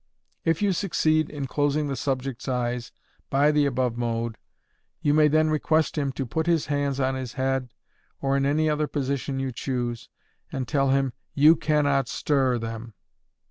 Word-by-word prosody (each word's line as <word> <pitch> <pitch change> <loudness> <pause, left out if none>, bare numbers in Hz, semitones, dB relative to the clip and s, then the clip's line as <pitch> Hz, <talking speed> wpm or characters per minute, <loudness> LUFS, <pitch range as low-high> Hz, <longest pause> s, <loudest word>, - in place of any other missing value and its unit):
If 165 +4 +1
you 200 -2 +3
succeed 155 -4 +1
in 145 -2 -4
closing 145 +2 0
the 140 -1 -2
subject's 130 -1 -3
eyes 120 -2 -2 0.4
by 145 +2 +4
the 150 -1 +3
above 125 -3 -1
mode, 115 -1 -2 0.6
you 145 - +2
may 155 0 +5
then 155 +1 +3
request 155 0 +1
him 140 -2 0
to 135 - -3
put 160 +7 -2
his 165 -4 +2
hands 145 -2 -1
on 130 0 +1
his 130 -2 -5
head, 135 -1 -1 0.5
or 135 0 0
in 140 - +2
any 150 +3 +2
other 150 0 +1
position 140 -1 -2
you 135 -1 -2
choose, 120 -2 -3 0.4
and 130 -2 -3
tell 140 -1 +1
him, 135 -1 +2 0.2
you 150 +3 +7
can 150 -1 +1
not 140 -3 +2
stir 135 -3 +1
them! 115 -1 -6
135 Hz, 175 wpm, -25 LUFS, 130-150 Hz, 0.6 s, you